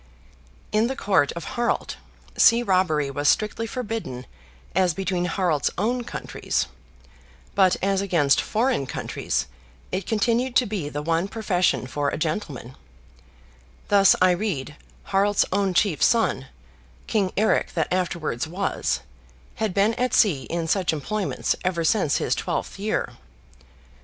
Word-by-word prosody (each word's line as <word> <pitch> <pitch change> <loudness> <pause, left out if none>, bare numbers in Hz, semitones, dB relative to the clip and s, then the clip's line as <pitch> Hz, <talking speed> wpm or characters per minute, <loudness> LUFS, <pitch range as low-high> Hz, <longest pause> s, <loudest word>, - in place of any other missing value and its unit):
In 215 +2 +2
the 265 - -3
Court 190 - +2
of 170 - -6
Harald, 240 +7 -2 0.4
sea 235 0 +5
robbery 175 -8 +1
was 145 +1 +1
strictly 220 +1 0
forbidden 220 - -5 0.5
as 180 -3 +2
between 185 -2 -1
Harald's 175 -4 +1
own 240 +5 0
countries, - - -2 0.9
but 190 -2 +4
as 195 0 +2
against 165 -8 +3
foreign 225 - 0
countries - - -2 0.5
it 185 0 -3
continued 235 +3 +1
to 250 - +5
be 200 -9 -3
the 145 0 -4
one 165 +3 0
profession 195 - 0
for 145 +2 -1
a - - -3
gentleman; 155 - -4 1.1
thus, 200 -2 +6
I 185 0 +5
read, 175 -7 -2 0.3
Harald's 200 +1 +2
own 195 -2 +1
chief 175 -3 +2
son, 220 - +2 0.6
King 200 -4 0
Eric 215 +2 +1
that 165 +1 0
afterwards 170 -7 -1
was, 160 - -1 0.6
had 220 -2 0
been 200 +4 +2
at 250 +2 0
sea 155 - +3
in 170 -1 -3
such 180 0 +1
employments 195 +7 -1
ever 180 -2 0
since 215 +6 +2
his - - 0
twelfth - - -3
year. 215 +2 -2
190 Hz, 135 wpm, -24 LUFS, 160-215 Hz, 1.1 s, thus